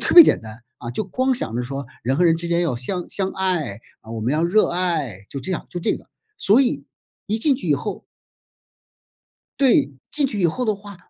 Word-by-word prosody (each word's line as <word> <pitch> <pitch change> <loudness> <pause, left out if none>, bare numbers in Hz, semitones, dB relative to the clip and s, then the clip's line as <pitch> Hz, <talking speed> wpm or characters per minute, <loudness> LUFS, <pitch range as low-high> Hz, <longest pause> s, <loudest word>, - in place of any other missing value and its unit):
特 - - +1
别 345 - +14
简 - - +3
单， 110 +1 -10 0.2
啊， 120 - -6
就 125 - -3
光 255 +7 0
想 115 - -1
着 125 - -1
说 135 +2 -5 0.2
人 130 +4 0
和 180 - +3
人 165 -1 +4
之 170 +1 -4
间 170 0 +2
要 165 -8 0
相 175 +9 -2
相 195 -1 0
爱 175 - -1 0.2
啊， 110 - -13
我 115 -1 -4
们 120 +5 0
要 155 +2 +1
热 195 +6 +3
爱， 155 - -2
就 140 - -4
这 135 - -5
样 175 - -3
就 175 - -4
这 - - +1
个， - - -17 0.3
所 215 - +4
以 260 - 0 0.4
一 215 +2 0
进 280 +4 +5
去 - - -6
以 - - +5
后 - - -5 1.6
对， 245 - +4 0.2
进 295 -1 +2
去 255 -6 -4
以 175 - +4
后 250 +10 -1
的 215 -3 +1
话， 200 0 -11
175 Hz, 245 characters per minute, -22 LUFS, 130-210 Hz, 1.6 s, 别